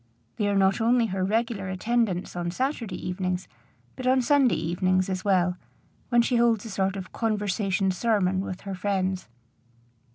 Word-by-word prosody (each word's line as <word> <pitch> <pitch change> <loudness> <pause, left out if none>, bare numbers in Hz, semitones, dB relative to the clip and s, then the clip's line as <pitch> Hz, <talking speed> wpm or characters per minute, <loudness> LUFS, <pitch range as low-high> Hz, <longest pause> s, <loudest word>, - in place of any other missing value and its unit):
They 210 - +1
are 200 - +1
not 195 +2 +3
only 235 +1 +3
her 190 -3 -2
regular 215 -1 -1
attendants 195 -1 -1
on 175 -1 -2
Saturday 235 - -2
evenings, 180 0 -2 0.5
but 255 - -4
on 260 0 +4
Sunday 275 -2 +4
evenings 185 +3 0
as 185 0 -3
well, 180 -2 +2 0.5
when 240 -1 +4
she 245 0 +1
holds 235 -2 +2
a 225 - -6
sort 190 0 0
of 190 -2 -7
conversation 205 -3 0
sermon 190 -2 +1
with 185 -1 -6
her 195 - -5
friends. 190 -1 -1
195 Hz, 160 wpm, -26 LUFS, 185-230 Hz, 0.5 s, on